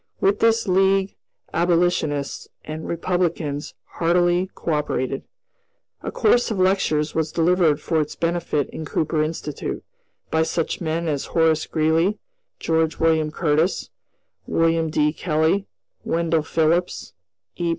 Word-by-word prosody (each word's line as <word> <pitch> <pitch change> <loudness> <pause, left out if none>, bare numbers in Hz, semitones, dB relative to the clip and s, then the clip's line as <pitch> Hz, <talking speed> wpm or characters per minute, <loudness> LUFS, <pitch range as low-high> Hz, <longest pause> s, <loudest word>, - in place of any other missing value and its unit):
With 200 +2 +2
this 230 -1 +3
League 195 +1 +2 0.4
abolitionists 170 -4 0 0.2
and 155 +1 -6
Republicans 170 -4 -2
heartily 175 +2 +1
co 165 - -2
operated. 135 -3 -2 0.8
A - - -4
course 240 +2 +3
of 215 - -2
lectures 185 -5 +1
was 160 -1 -1
delivered 165 -3 +3
for 160 +1 0
its 150 - -4
benefit 170 -4 -1
in 160 - -6
Cooper 155 +1 -1
Institute, 155 -2 -4 0.5
by 160 - +2
such 160 +1 -1
men 165 0 -1
as 145 -3 -1
Horace 160 -1 +3
Greeley, 160 +6 +1 0.4
George 160 -1 0
William 160 -1 +2
Curtis, 155 +2 0 0.6
William 165 0 +2
D. 150 0 +1
Kelly, 165 +4 0 0.4
Wendell 165 -1 +1
Phillips, 165 +3 0 0.4
E. 170 -1 -1
165 Hz, 120 wpm, -22 LUFS, 155-175 Hz, 0.8 s, this